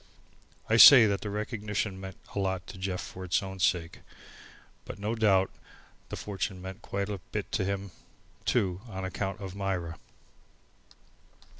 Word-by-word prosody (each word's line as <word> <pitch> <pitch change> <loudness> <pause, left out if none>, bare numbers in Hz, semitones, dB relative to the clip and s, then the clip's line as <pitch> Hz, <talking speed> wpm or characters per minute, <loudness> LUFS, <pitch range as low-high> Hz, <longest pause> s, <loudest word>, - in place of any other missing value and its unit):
I 110 - +3
say 120 0 +11
that 100 -2 0
the 105 - -4
recognition 105 -2 -3
meant 95 -1 -8 0.2
a - - -2
lot 95 -2 -1
to 95 - -10
Jeff 95 -1 -2
for 95 - -8
its 90 +2 +1
own 95 0 -7
sake. 85 -1 0 0.8
But - - -8
no 105 +2 -2
doubt 100 -4 +3 0.6
the - - -4
fortune 95 -1 -4
meant 95 +1 -8
quite 100 0 -3
a 100 -2 -4
bit - - -4
to - - 0
him 100 0 -3 0.5
too 95 -1 0
on 95 -2 -5
account 95 +1 -3
of 95 -2 -6
Myra. 95 -4 -3
95 Hz, 155 wpm, -29 LUFS, 95-100 Hz, 0.8 s, say